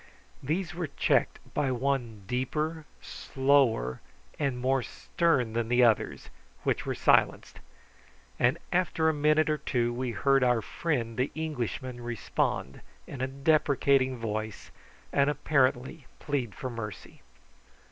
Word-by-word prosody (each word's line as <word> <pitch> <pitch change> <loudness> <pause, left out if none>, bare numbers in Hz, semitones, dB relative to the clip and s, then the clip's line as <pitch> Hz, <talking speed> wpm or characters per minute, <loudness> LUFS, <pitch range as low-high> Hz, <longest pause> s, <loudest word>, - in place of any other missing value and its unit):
These 160 +4 -2
were 170 -1 -3
checked - - +1 0.2
by 135 -3 0
one 125 -5 -2
deeper, 150 +7 -2 0.2
slower, 130 - +1 0.4
and 140 -4 0
more 130 +1 +1
stern 125 -2 0
than 115 -1 -1
the 125 +1 +4
others, 115 -3 +1 0.3
which - - -1
were - - -1
silenced; - - +2 0.8
and 125 +6 +3 0.2
after 170 -3 +2
a - - +1
minute 155 +1 +3
or 155 -1 0
two, 120 -3 0
we 125 +1 -2
heard 135 +3 +2
our 120 -3 +2
friend 120 -8 -2
the 130 - +1
Englishman 130 -5 -4
respond 115 - -2 0.2
in 135 - -7
a 130 - 0
deprecating 135 -2 +2
voice, 110 -1 -5 0.4
and 140 0 +3
apparently 135 -1 0
plead 135 -7 -3
for 130 - -5
mercy. 110 -3 -8
130 Hz, 125 wpm, -29 LUFS, 120-150 Hz, 0.8 s, the